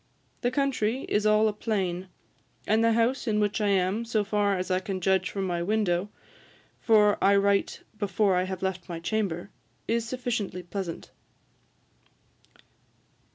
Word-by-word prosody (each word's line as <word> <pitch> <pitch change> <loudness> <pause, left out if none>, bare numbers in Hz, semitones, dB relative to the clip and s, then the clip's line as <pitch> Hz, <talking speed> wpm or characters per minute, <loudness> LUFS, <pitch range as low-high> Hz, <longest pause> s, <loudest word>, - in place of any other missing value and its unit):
The 245 - +1
country 260 -2 0
is 210 0 +2
all 215 +1 +4
a 215 - 0
plain; 190 -4 -2 0.6
and 220 +2 +2
the 230 0 +4
house 235 +3 +1
in 210 -1 +1
which 210 +1 0
I 210 - +2
am, 195 +3 +1
so 225 -2 0
far 205 -1 +1
as 185 +1 -3
I 185 - +2
can 190 0 -4
judge 190 0 +1
from 195 -1 -3
my 175 -2 -1
window, 195 -1 0 0.7
for 210 -2 +4
I 200 +1 +5
write 200 0 +1 0.2
before 200 -1 +1
I 180 +1 +1
have 190 0 -5
left 190 -1 -3
my 170 -1 -4
chamber, 175 -1 -2 0.4
is 230 0 +1
sufficiently 235 -8 -3
pleasant. 175 -1 -6
205 Hz, 155 wpm, -27 LUFS, 185-220 Hz, 0.7 s, I